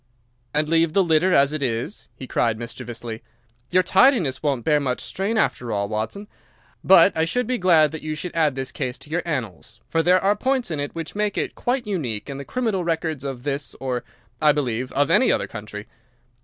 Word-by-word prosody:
"And 150 +3 0
leave 165 0 +2
the 195 - +4
litter 170 +2 +3
as 140 -2 +4
it 155 - -3
is?" 125 - -3
he 130 - -8
cried, 115 -3 0
mischievously. 120 -1 -7 0.5
"Your 185 +1 +3
tidiness 185 - +3
won't 140 -6 -1
bear 150 -1 +4
much 130 -3 -2
strain 200 +4 -2
after 120 - 0
all, 100 -1 -1
Watson. 110 - -4 0.6
But 190 +1 +6
I 160 - +2
should 245 +10 0
be 255 -1 -1
glad 165 -5 +5
that 160 - -6
you 155 0 -4
should 175 +3 -6
add 155 -4 +2
this 135 -1 -4
case 130 -4 -4
to 135 +4 -12
your 175 +2 0
annals, 125 - -5
for 165 - +1
there 180 +3 +4
are 200 +2 +2
points 255 -2 -1
in 155 - -2
it 145 +2 -4
which 165 -1 -5
make 210 0 -1
it - - -1
quite 245 0 -1
unique 140 - -3
in 135 - -6
the 140 - -7
criminal 220 - -1
records 160 -4 -2
of 135 -3 -5
this 140 -2 -3
or, 125 -2 -2 0.4
I 150 -1 +6
believe, 125 -4 -2
of 145 +1 +2
any 255 - +5
other - - +1
country. 105 -2 -8
150 Hz, 210 wpm, -23 LUFS, 125-180 Hz, 0.6 s, But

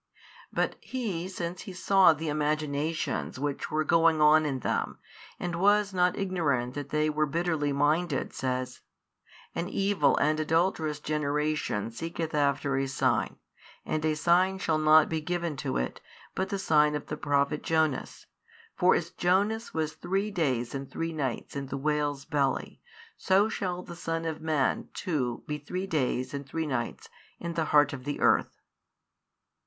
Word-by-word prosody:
But - - -1
He 200 -9 -3
since 180 -2 -5
He 195 - -8
saw 190 0 +5
the 160 +1 -3
imaginations 150 0 -1
which 140 +1 -3
were 155 0 +1
going 165 0 +4
on 155 0 +5
in 135 -3 -2
them, - - -1 0.4
and 175 -1 -3
was 205 0 +4
not 180 -1 +2
ignorant 150 -11 0
that 145 0 -5
they 150 0 +1
were 155 0 +1
bitterly 160 -1 0
minded, 145 +2 +1
says, 130 -1 -3 0.7
An 175 - -3
evil 195 -8 +2
and 155 +1 +2
adulterous 160 -1 +1
generation 150 -7 -1
seeketh 165 +5 -4
after 140 -1 +1
a 135 0 0
sign, 135 - 0 0.5
and 155 - -2
a 155 -1 +1
sign 180 +4 +3
shall 160 -4 0
not 155 0 +6
be 160 -1 -2
given 170 -1 -2
to 140 -2 -2
it, 60 - -3 0.3
but 190 0 -2
the 200 - -1
sign 150 -5 +3
of 150 - -4
the - - -4
prophet 145 0 0
Jonas; 160 -4 0 0.5
for 180 0 +4
as 170 +1 -2
Jonas 200 +6 +1
was 155 -1 -2
three 195 +4 -2
days 130 - -1
and 135 -1 -5
three 165 +4 -3
nights 135 -5 -3
in 140 -1 -4
the 135 - -4
|605 - - -7
whale's 145 -2 0
belly, 140 -3 -1 0.4
so 195 +3 +3
shall 180 -4 -3
the 170 - -9
Son 165 -1 -3
of 160 -1 -3
man 155 -4 0
too 135 - -2
be 150 0 -4
three 180 +6 -4
days 130 -7 -1
and 140 -1 -6
three 160 +1 -2
nights 130 -5 -3 0.3
in 170 - -4
the 165 -1 0
heart 145 -2 +4
of 130 -2 -6
the 145 +2 -4
earth. - - +2
155 Hz, 165 wpm, -28 LUFS, 145-175 Hz, 0.7 s, not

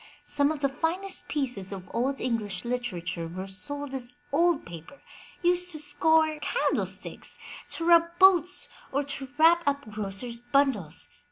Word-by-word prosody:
Some 285 0 +3
of 305 -2 -5
the 275 - +3
finest 335 +8 -1
pieces 245 -10 -2
of 190 -1 -7
Old 265 +3 0
English 215 -6 -2
literature 185 -9 -3
were 185 +3 -6
sold 280 +9 -2
as 245 -2 -3 0.2
old 340 0 +3
paper, 170 - -11 0.4
used 360 +1 +2
to 310 - -5
scour 315 0 +3
candlesticks, 485 +11 -1 0.3
to 330 - -3
rub 340 0 +4
boots, 370 -2 +5 0.2
or 280 +2 0
to 275 -1 -6
wrap 330 +2 +6
up 280 -3 0
grocers' 215 +3 -2
bundles. 245 - 0
275 Hz, 145 wpm, -27 LUFS, 210-320 Hz, 0.4 s, wrap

